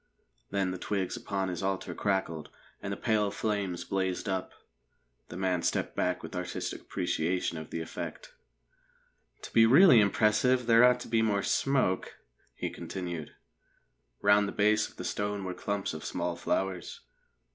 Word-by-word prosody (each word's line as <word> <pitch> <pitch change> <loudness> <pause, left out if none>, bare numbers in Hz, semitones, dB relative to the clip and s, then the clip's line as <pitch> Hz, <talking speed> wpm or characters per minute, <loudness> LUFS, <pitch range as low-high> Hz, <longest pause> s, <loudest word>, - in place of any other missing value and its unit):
Then 95 -2 0
the 90 - -5
twigs 95 -3 -2
upon 95 -2 -2
his 90 -2 -4
altar 95 -1 -2
crackled, 95 -6 -1 0.3
and - - -4
the - - -3
pale 105 -2 +1
flames 100 -4 -2
blazed 95 0 -2
up. 95 -1 -2 0.8
The 85 - -8
man 90 -2 0
stepped - - -1
back 90 0 0
with 80 - -7
artistic 90 0 -4
appreciation 85 0 -1
of 80 - -9
the 85 - -4
effect. 80 - -7 1.1
"To - - -9
be 115 0 +7
really 140 +1 +8
impressive, 110 +5 +3
there 115 0 +6
ought 125 0 +5
to - - -7
be 115 -1 +2
more 105 -3 +1
smoke," 130 -9 +1 0.4
he - - -3
continued. 85 -5 -6 0.9
Round 100 0 +5
the - - -3
base 105 +1 +2
of - - -20
the - - -7
stone 105 -1 -2
were 90 -1 -3
clumps 100 -1 -3
of 80 - -7
small - - -2
flowers. 95 -2 -2
95 Hz, 155 wpm, -30 LUFS, 90-105 Hz, 1.1 s, really